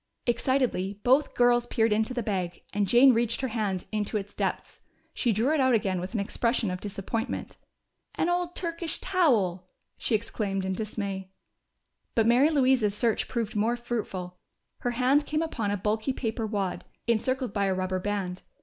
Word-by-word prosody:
Excitedly 235 -5 0
both 265 +4 +3
girls 240 0 +4
peered 225 -3 +2
into 220 +3 +1
the 245 -2 -2
bag, 185 -5 -3
and 205 -1 +1
Jane 250 +5 +7
reached 230 +1 +1
her 260 - -1
hand 205 -5 -2
into 215 0 -1
its 205 0 -6
depths. - - -3 0.3
She 240 - +1
drew 230 +8 +2
it 315 - +2
out 260 -2 +4
again 190 -4 0
with 185 +6 -6
an - - +1
expression 230 +1 0
of 180 +1 -5
disappointment. 210 +4 -4 0.6
"An - - +1
old 350 0 0
Turkish 335 -1 -3
towel!" 215 - +1 0.3
she 230 - +1
exclaimed 200 -3 -2
in 190 - -1
dismay. 200 -2 -4 0.9
But 225 - +4
Mary 245 +6 +5
Louise's 260 -8 +3
search 230 0 +1
proved 230 -4 -3
more 220 +3 +2
fruitful. 200 -7 -4 0.4
Her 245 - -1
hand 275 +4 +3
came 310 +1 0
upon 230 -10 -2
a 205 - 0
bulky 215 +6 -1
paper 225 -2 -2
wad, 200 -4 -2 0.2
encircled 250 +1 0
by 200 -2 +1
a 190 -1 +1
rubber 185 0 -1
band. 190 -2 -3
220 Hz, 170 wpm, -28 LUFS, 200-255 Hz, 0.9 s, Jane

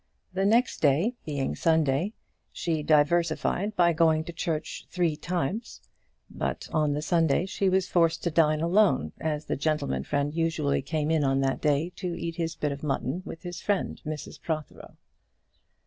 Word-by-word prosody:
The 190 +1 +1
next 235 +4 +2
day, 155 - +3
being 140 -3 -2
Sunday, 160 +3 +2 0.4
she 160 -2 -2
diversified 165 +6 +2
by 170 -1 +4
going 160 -1 +3
to 170 +1 -8
church 165 -2 -3
three 175 -4 0
times; 180 - -3 0.5
but - - -4
on 150 -2 +2
the 150 +1 -2
Sunday 165 -1 +2
she 195 0 0
was 185 0 +2
forced 165 -2 +2
to 170 - 0
dine 155 -1 +3
alone, 170 - +3
as 155 -1 -2
the - - -1
gentleman 145 - -1
friend 145 - -1
usually 160 -4 0
came 155 +2 -1
in 160 -2 +2
on 135 0 +2
that 135 0 0
day 150 +3 +1
to 175 -2 -4
eat 165 -1 -4
his 165 -1 -2
bit 150 -2 -1
of 140 0 -6
mutton 145 +2 -2
with 165 - -8
his 175 -1 -6
friend, 205 -2 -1
Mrs 155 -1 -6
Protheroe. 155 -2 -5
160 Hz, 165 wpm, -27 LUFS, 150-175 Hz, 0.5 s, by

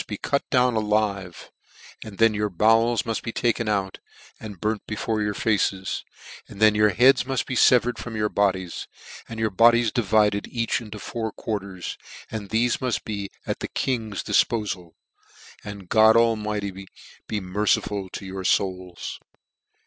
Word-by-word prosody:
be 105 - -5
cut 140 - 0
down 125 -2 +3
alive; 105 -4 -1 0.5
then 110 +1 +2
your 105 0 -1
bowels 115 +4 +3
muft 115 -1 -3
be 115 - -4
taken 115 -1 0
out, 95 -2 -1 0.4
and 105 -4 -9
burnt 110 +1 -1
before 110 0 -2
your 105 -1 -1
faces; 95 -3 0 0.4
then 110 +1 +3
your 105 0 +4
heads 125 +5 +5
muff: 130 -1 -2
be - - -5
fevered 125 -1 +4
from 115 -2 -6
your 105 -1 +1
bodies, 95 -4 -1 0.4
and 115 -1 -6
your 110 -1 0
bodies 115 +2 +5
di 125 - +1
vided 105 -1 +2
each 115 0 -1
into 105 -2 -9
four 110 +1 -4
quarters; 100 -4 -5 0.3
and 105 -3 -5
thefe 120 +2 +1
mult 125 -6 0
bt* 100 -2 -4 0.2
at - - -3
the - - -4
King's 110 -6 -2
difpofal. 100 -7 0 0.7
And 100 -3 -8
God 110 +3 +6
Almighty 105 -4 0 0.4
be 105 - -2
merciful 100 0 -1
to 95 - -7
your 95 0 -6
fouls." 90 -2 -1
105 Hz, 150 wpm, -24 LUFS, 100-115 Hz, 0.7 s, God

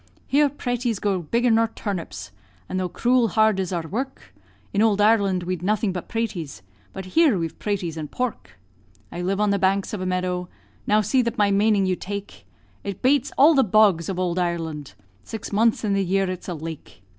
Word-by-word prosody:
Here 290 +1 +3
praties 245 -4 -2
grow 195 -3 0
bigger 235 +9 +1
nor 225 0 +4
turnips; 195 - -6 0.4
And 185 - -2
though 185 -1 -2
cruel 245 +4 +2
hard 220 -1 +3
is 190 -1 -2
our 170 -3 -3
work, 245 - -5 0.4
In 200 - +2
ould 215 -2 +3
Ireland 200 -4 +3
we'd 180 -1 -3
nothing 210 +1 0
but 180 - -6
praties, 180 - -4 0.3
But 190 - -7
here 315 - +4
we 165 - -1
have 165 - -9
praties 190 -6 -2
and 155 -2 -5
pork. 250 - -4 0.5
I 175 - -5
live 190 +2 -1
on 210 -1 +2
the 200 - +1
banks 195 +1 +1
of 205 - -3
a 185 - -2
meadow, 180 -1 -2 0.4
Now 215 +1 +4
see 250 +5 +2
that 235 0 -3
my 205 -2 +3
maning 205 0 +3
you 185 -1 +1
take; 200 +2 -7 0.4
It 200 -1 -6
bates 270 0 +3
all 300 +4 +7
the 270 -3 +4
bogs 200 -5 +3
of 190 - -3
ould 180 -1 -1
Ireland 165 -5 -3 0.3
Six 225 - -7
months 225 +3 +2
in 205 -2 +1
the 195 0 +1
year 195 +1 +1
it's 185 - -7
a 175 - -3
lake. 160 - -9
200 Hz, 200 wpm, -23 LUFS, 180-225 Hz, 0.5 s, all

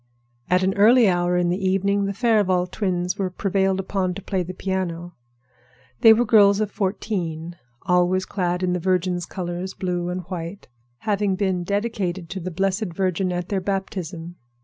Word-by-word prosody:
At 180 +1 +3
an 190 +1 +2
early 230 +3 +6
hour 175 -1 +2
in 175 -1 +1
the 185 +3 -1
evening 200 +1 +1
the 200 - -2
Farival 205 -6 +2
twins 180 -1 -2
were 190 -2 0
prevailed 190 0 0
upon 190 -1 -1
to 200 - -6
play 190 -3 -1
the 180 +1 -5
piano. 175 -2 -3 0.9
They 225 - +8
were 230 +2 +4
girls 205 -2 +5
of 215 -1 -1
fourteen, 180 -5 -3 0.3
always 180 +1 +2
clad 180 -2 -2
in 180 -1 +1
the 180 - -1
Virgin's 180 0 0
colors, 180 0 -5
blue 175 -1 -2
and 180 +1 -3
white, 180 +1 -7 0.3
having 205 -2 0
been 185 -2 0
dedicated 195 -3 -2
to 195 - -4
the 180 +1 -4
Blessed 195 +3 -1
Virgin 185 0 0
at 175 0 -3
their 195 -2 0
baptism. 180 -3 -4
185 Hz, 170 wpm, -23 LUFS, 180-200 Hz, 0.9 s, They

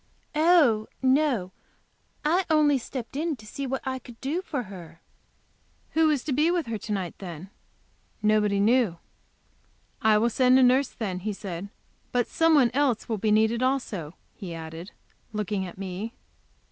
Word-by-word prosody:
"Oh, 300 -9 +4 0.2
no, 260 -8 +2 0.7
I 345 +5 +3
only 300 -3 +4
stepped 250 0 -7
in 315 +2 -1
to 215 -4 -15
see 275 +5 -5
what 270 +1 -3
I 260 0 -2
could 240 -3 -14
do 300 +7 -2
for 285 -8 -3
her." 175 -5 -11 0.9
"Who 320 -1 +3
is 290 -5 +1
to 290 - -2
be 300 +5 +3
with 345 -3 0
her 225 -2 -4
to 215 - -7
night, 190 -5 -2
then?" 180 0 -8 0.7
Nobody 210 -1 +3
knew. 220 -4 +3 1.0
"I 220 -1 +5
will 235 +3 +2
send 255 +2 +4
a 265 - +6
nurse, 255 +2 +4
then," 195 -6 -4
he 210 +3 -3
said. 195 -1 -6 0.4
"But 245 -1 +2
some 325 -1 +3
one 255 -5 +5
else 265 -5 +1
will 220 -3 -2
be 215 - 0
needed 220 +2 +3
also," 235 - -1 0.2
he 175 -4 -7
added, 165 +3 -8 0.4
looking 205 -2 -2
at 175 - -11
me. 195 +4 -5
230 Hz, 165 wpm, -26 LUFS, 200-275 Hz, 1.0 s, a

